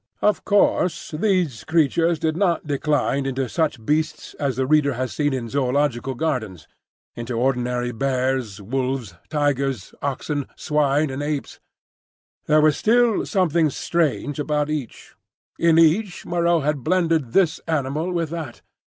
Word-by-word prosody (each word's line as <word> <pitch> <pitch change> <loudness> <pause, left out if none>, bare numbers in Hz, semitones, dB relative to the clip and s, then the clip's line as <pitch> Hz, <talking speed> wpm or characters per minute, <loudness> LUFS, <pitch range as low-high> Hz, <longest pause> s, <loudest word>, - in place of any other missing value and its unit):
Of 210 -2 +2
course 200 -3 +2
these 170 - 0
creatures 165 +1 +2
did 155 0 -1
not 175 -3 +1
decline 145 -1 0
into 135 -1 -2
such 145 -5 -1
beasts 155 +3 -1
as 140 -3 -1
the 130 - 0
reader 145 0 +3
has 130 0 -3
seen 145 -1 0
in 130 -3 -3
zoological 135 0 0
gardens,—into 120 - -5
ordinary 125 -1 0
bears, 130 -3 -1
wolves, 125 -1 -3 0.2
tigers, 140 - -1
oxen, 140 +1 -2
swine, 150 -1 +1
and 135 +2 -4
apes. 145 -1 -4 0.9
There 155 0 +5
was 155 -1 +3
still 235 -1 +2
something 170 -5 +2
strange 150 -1 -1
about 150 0 0
each; 145 -6 -6 0.5
in 165 -1 +4
each 175 +4 +3
Moreau 170 -1 +1
had 145 -2 -1
blended 165 -6 +1
this 180 -5 +3
animal 155 +2 -1
with 165 -3 -2
that. 160 -8 -6
145 Hz, 135 wpm, -22 LUFS, 130-165 Hz, 0.9 s, There